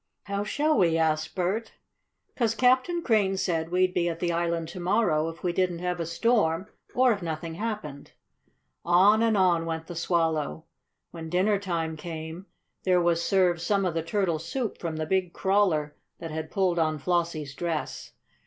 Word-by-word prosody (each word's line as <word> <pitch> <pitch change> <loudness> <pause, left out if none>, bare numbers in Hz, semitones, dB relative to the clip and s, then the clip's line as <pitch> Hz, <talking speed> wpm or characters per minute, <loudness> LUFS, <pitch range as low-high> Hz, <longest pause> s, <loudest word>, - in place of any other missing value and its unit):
"How 200 0 -2
shall 295 +5 +1
we?" 165 -3 +3
asked 160 -1 0
Bert. 200 +5 -1 0.6
"'Cause 230 -3 +1
Captain 255 +9 +2
Crane 200 -5 +2
said 165 -4 -1
we'd 185 +1 +2
be 175 -1 +1
at 165 -1 -5
the 175 0 0
island 170 -1 -1
to 180 - -8
morrow 175 -4 +1
if 165 +1 -11
we 175 -1 0
didn't 180 -1 0
have 180 0 -2
a 165 - -2
storm, 185 -2 +1 0.3
or 255 0 +5
if 205 -3 -1
nothing 165 0 -4
happened." 170 -8 -5 0.7
On 195 +5 +5
and 225 -2 +3
on 175 -3 +3
went 160 0 -3
the 175 - -8
Swallow. 165 -2 0 0.5
When 165 -1 -7
dinner 195 +4 +2
time 165 -5 -3
came 160 +3 -7 0.3
there 180 -1 +3
was 170 -1 +2
served 180 -3 +2
some 195 +2 +1
of 180 - 0
the 165 - -1
turtle 170 -1 0
soup 230 - -4
from 165 -2 -4
the 155 0 -2
big 185 +1 0
crawler 190 -7 +1 0.2
that 165 -1 -7
had 160 0 -4
pulled 185 -4 +1
on 155 -1 +1
Flossie's 165 -3 -1
dress. 160 +2 -4
175 Hz, 175 wpm, -27 LUFS, 165-195 Hz, 0.7 s, or